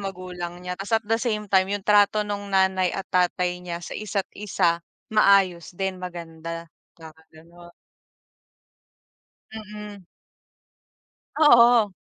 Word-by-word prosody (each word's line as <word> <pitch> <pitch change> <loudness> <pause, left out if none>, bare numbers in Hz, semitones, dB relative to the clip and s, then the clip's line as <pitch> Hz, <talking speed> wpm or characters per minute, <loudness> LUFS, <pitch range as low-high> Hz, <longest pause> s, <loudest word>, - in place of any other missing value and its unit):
magulang 180 -2 -6
niya. 180 - -3
Ta's 195 +5 -1
at 220 - -4
the 225 +2 0
same 215 -4 -1
time, 190 0 +4
yung 200 0 -3
trato 210 0 +4
nung 205 -1 -5
nanay 190 -1 +2
at 195 - -4
tatay 180 0 +1
niya 175 -1 -6
sa - - -8
isa't-isa, 200 -4 -1 0.3
maayos 195 -5 +3
din, 190 -1 -3
maganda, 165 -2 -7 0.3
parang 160 -2 -12 0.2
gano'n. 170 +2 -17 1.8
Mm. 210 -2 -9 1.3
Oo. 235 -8 +6
190 Hz, 115 wpm, -24 LUFS, 175-210 Hz, 1.8 s, Oo